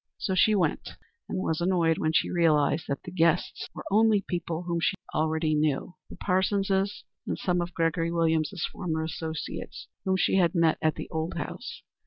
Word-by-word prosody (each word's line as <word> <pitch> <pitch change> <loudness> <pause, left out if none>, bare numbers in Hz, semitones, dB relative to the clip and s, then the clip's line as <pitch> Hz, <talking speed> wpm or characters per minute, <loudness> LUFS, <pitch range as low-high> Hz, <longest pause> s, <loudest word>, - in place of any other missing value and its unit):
So 190 - -2
she 215 +3 +4
went, 190 - -1 0.3
and - - -2
was 160 -3 -1
annoyed 170 -3 +2
when 155 - +1
she - - +2
realized 160 -2 +3
that 140 - -3
the 180 - -8
guests 170 -1 +1
were - - -7
only 215 -1 +4
people 170 -1 -3
whom 170 -1 -1
she 180 - +1
knew - - -31
already 155 0 +1
the 155 +4 -2
Parsonses, 195 +1 +1 0.2
and - - -1
some 180 -1 0
of 175 0 -5
Gregory 165 0 +1
Williams's 165 +1 +1
former 160 -4 -2
associates, 160 0 -5 0.2
whom 190 0 +1
she 190 - +2
had 175 -1 +3
met 165 -2 +3
at 155 0 +2
the - - -6
old 160 +1 -2
house. - - -6
170 Hz, 180 wpm, -27 LUFS, 160-185 Hz, 0.3 s, she